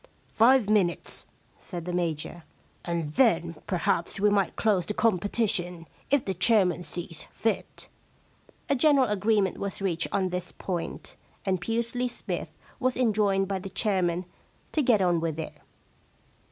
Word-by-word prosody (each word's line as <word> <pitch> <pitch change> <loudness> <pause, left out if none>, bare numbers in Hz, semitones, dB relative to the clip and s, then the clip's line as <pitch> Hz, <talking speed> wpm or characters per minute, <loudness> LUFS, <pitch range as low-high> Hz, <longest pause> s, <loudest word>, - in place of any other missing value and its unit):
* - - -36
Five 240 0 +5
minutes/ 200 -5 0 0.3
said 175 -4 -7
the 180 - -3
Major. 170 -1 -2 0.2
* - - -25
And 170 -3 -2
then 170 - +2
perhaps 175 0 0
we 205 +1 +4
might 200 -2 +1
close 205 -5 +2
the 210 - -3
competition, 200 -4 0 0.2
if 285 -2 +2
the 190 - -1
chairman 185 -2 +3
sees 175 -2 -6
fit/ 225 0 -3 0.8
A - - +3
general 275 0 +5
agreement 210 -1 +1
was 200 -1 -3
reached 175 -4 0
on 190 -2 +1
this 180 -1 -4
point, 175 -3 -5 0.3
and 190 -2 0
Pusely 235 +4 -1
Smythe 240 - -4 0.3
was 255 0 0
enjoined 205 -5 +2
by 195 -1 -2
the 195 - -7
chairman 185 -3 0 0.5
to 310 - +1
get 230 -7 +4
on 175 -2 +3
with 165 -1 -2
it. 160 - -4
195 Hz, 150 wpm, -27 LUFS, 175-220 Hz, 0.8 s, Five